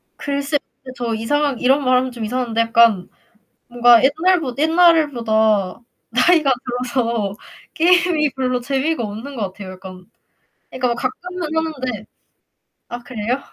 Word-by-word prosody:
글쎄요 280 +1 -2 0.4
저 235 -2 -3
이상하게 280 +4 -1
이런 270 +3 +3
말하면 255 0 +2
좀 235 -2 -7
이상한데 235 0 -1
약간 230 -4 +3 0.6
뭔가 240 -1 +5
옛날보 315 -1 +1
옛날보다 240 - +2 0.3
나이가 315 -6 +3 0.4
들어서 230 -6 -1 0.4
게임이 345 -3 +3
별로 255 -2 -1
재미가 275 +3 -1
없는 225 +7 -7
것 225 - -4
같아요 190 -1 -9
약간. 185 -1 -12 0.6
그니까 255 -1 -2
뭐 235 - -1
가끔은 355 +7 -5
하는데. 260 -9 -3 0.8
아 240 - -6
그래요? 245 0 -3
255 Hz, 290 characters per minute, -19 LUFS, 230-295 Hz, 0.8 s, 뭔가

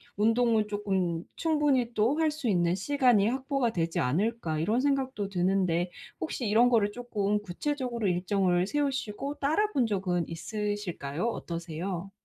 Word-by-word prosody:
운동을 225 0 +3
쪼끔 190 -5 -1
충분히 290 -7 +1
또 235 +7 +2
할 315 -1 +3
수 300 -4 -4
있는 175 -4 +2
시간이 245 -1 +3
확보가 260 -1 0
되지 165 -3 -1
않을까.‘ 170 - 0
이런 215 +10 +1
생각도 265 -6 0
드는데 180 -2 +1 0.3
혹시 215 +9 -3
이런 230 +4 +5
거를 215 -4 +3
쪼끔 210 -4 -1
구체적으로 235 +3 -2
일정을 180 0 +1
세우시고 275 -1 -2
따라본 310 - +1
적은 185 -5 -1
있으실까요? 180 -3 -3
어떠세요? 170 -1 -4
210 Hz, 325 characters per minute, -29 LUFS, 180-250 Hz, 0.3 s, 이런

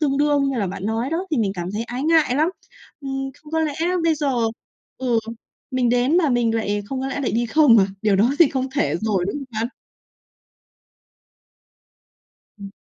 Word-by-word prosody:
tương 280 -3 +1
đương 290 -1 +2
như 265 - -3
là 200 - 0
bạn 185 +1 -6
nói 225 +4 -1
đó 350 +4 -2
thì - - +2
mình 205 -4 +1
cảm 175 0 -5
thấy 220 +3 -3
ái 245 +2 -5
ngại 315 -5 +3
lắm, 310 +4 +2 0.5
ừm. 270 -1 -4
Không 300 - -15
có 320 - +1
lẽ 305 -2 -1 0.3
bây 325 -1 +3
giờ 290 -2 -1 0.7
ừ, 245 -3 +1 0.5
mình 255 -2 +1
đến 245 +6 +2
mà 335 -5 +3
mình 240 -3 +1
lại 205 -2 -1
không 260 +4 -4
có 265 - -2
lẽ 275 - -3
lại 265 - -1
đi 235 +1 0
không 245 -2 +5
à? 195 - +4 0.2
Điều 210 -3 +3
đó 220 +6 +3
thì 335 -5 +7
không 265 -1 -2
thể 290 - +1
rồi, 210 -5 0
đúng 200 - -3
không 285 - -5 0.2
bạn? 230 - -1 2.9
Ừm. 200 -1 -9
255 Hz, 200 wpm, -22 LUFS, 225-290 Hz, 2.9 s, thì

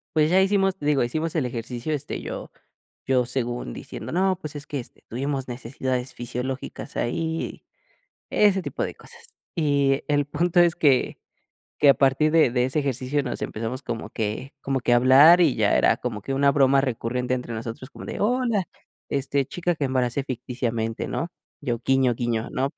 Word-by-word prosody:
Pues 155 0 +4
ya 190 +2 +5
hicimos 195 -1 +2
digo, 145 -2 +2
hicimos 155 +7 -2
el 155 -5 +1
ejercicio, 120 +4 -4
este, 145 - -4
yo - - -6 0.5
yo 130 -2 +2
según 120 - -2
diciendo, - - -7
no, 185 +1 +2
pues 155 -3 -6
es 145 0 -7
que, 145 - -3
este, 120 - -10
tuvimos 135 +2 -3
necesidades 125 +1 -3
fisiológicas 125 +2 -5
ahí 160 +6 -2 0.7
y, - - -3
ese 190 -1 0
tipo - - -3
de - - -5
cosas. - - -13 0.3
Y 140 -4 +2
el 145 -1 +2
punto 170 +5 +1
es 170 -1 +4
que 140 -6 +2 0.6
que 145 - +6
a 140 - +9
partir 140 +3 +3
de 160 -4 +5
de 125 +1 +1
ese 130 +4 +1
ejercicio 140 +1 -1
nos 125 - -4
empezamos 115 +4 -4
como 120 -3 -5
que 110 +5 -4
como 135 -1 -1
que 120 0 +2
a - - +6
hablar 135 +8 +7
y 155 -7 +4
ya 105 -2 +2
era - - +4
como 115 -4 -4
que 135 - -4
una 140 +1 +4
broma 135 -1 +4
recurrente 125 -1 -1
entre 125 -2 -3
nosotros, 115 +3 -6
como - - -10
de, - - -5
hola, 230 -2 +1 0.5
este, 140 0 0
chica 175 +4 -2
que 155 - -3
embaracé 130 0 0
ficticiamente, 120 -3 -3
¿no? 165 - -2 0.3
Yo, 120 -5 -2
guiño, 135 -2 +3
guiño, 115 -1 -2
¿no? 135 +1 0
135 Hz, 180 wpm, -24 LUFS, 125-150 Hz, 0.7 s, a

